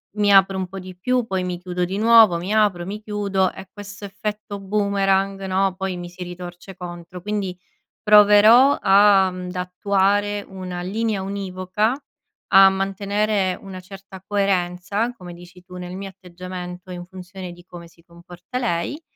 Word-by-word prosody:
mi 205 -1 +2
apro 195 0 +5
un 185 - -3
po' 195 +1 -8
di 185 -1 -10
più, 250 +5 0
poi 190 -2 -1
mi 180 -1 -4
chiudo 180 0 -2
di 195 +3 -4
nuovo, 225 -5 +6
mi 180 +4 -5
apro, 205 -5 +2
mi 210 +2 -5
chiudo 200 -3 -1
e 190 - -11
questo 205 0 -10
effetto 205 +1 -5
boomerang 195 -1 0
no, 190 0 0
poi 190 -1 -3
mi 175 0 -7
si 180 +1 -8
ritorce 175 +1 -9
contro; 175 0 -9
quindi 200 -2 -3 0.5
proverò 210 +5 +7
ad 190 -2 +4
attuare 200 +3 0
una 185 -2 -6
linea 210 +2 -2
univoca, 195 +3 -2 0.6
a 195 0 +9
mantenere 195 0 -1
una 190 -2 -9
certa 190 0 -12
coerenza 195 +2 -1
come 175 -3 -10
dici 175 +1 -15
tu 180 0 -11
nel 180 0 -7
mio 195 0 -6
atteggiamento, 180 0 -9
in 175 -1 -6
funzione 185 0 -9
di 175 0 -14
come 175 -2 -11
si 165 0 -24
comporta 175 +7 -9
lei, 235 - -2
190 Hz, 155 wpm, -22 LUFS, 180-205 Hz, 0.6 s, a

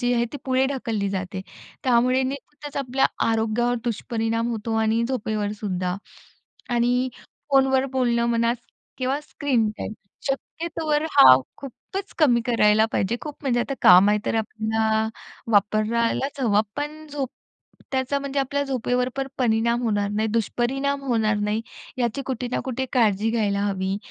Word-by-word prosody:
जी 245 -1 +1
आहे 235 0 +2
ती - - -4
पुढे 260 0 +2
ढकलली 230 -7 -2
जाते. 190 -1 -4 0.4
त्यामुळे 255 +1 +3
नेहमीच 280 +2 -6
आपल्या 270 -1 +2 0.2
आरोग्यावर 225 +2 +1
दुष्परिणाम 230 0 -1
होतो 225 -1 -3
आणि 220 +1 +2
झोपेवरसुद्धा. 205 -6 -2 0.7
आणि 245 +1 +2 0.4
फोनवर 270 -1 +4
बोलणं 240 -2 +1
म्हणा 230 0 +2 0.5
किंवा 265 +2 0
स्क्रीन 265 -7 0
टाईम, - - -4 0.4
शक्यतोवर 310 +2 -2
हा 130 -1 +10 0.2
खूपच 380 +9 -7
कमी 245 -7 +4
करायला 220 -2 +4
पाहिजे. 195 +5 0
खूप 300 -1 -6
म्हणजे 245 -3 +1
आता 275 +3 -2
काम 180 +3 +8
आहे, 210 - +3
तर - - 0
आपल्याला 220 0 0 0.4
वापरायलाच 230 +6 +1
हवा, 210 -5 +3 0.2
पण 305 +2 -5
झोप 275 -3 -2 0.6
त्याचा 265 +2 0
म्हणजे 280 0 -2
आपल्या 285 +1 -1
झोपेवर 250 -2 0
पण 270 0 -2
परिणाम 235 0 +2
होणार 205 -3 0
नाही, 215 +2 0
दुष्परिणाम 260 +5 0
होणार 225 -5 +1
नाही, 210 +2 -1 0.4
याची 240 +3 -1
कुठे 250 -2 -3
ना - - 0
कुठे 260 0 -2
काळजी 220 -3 +2
घ्यायला 205 -3 0
हवी. 190 -1 -1
235 Hz, 140 wpm, -24 LUFS, 220-265 Hz, 0.7 s, हा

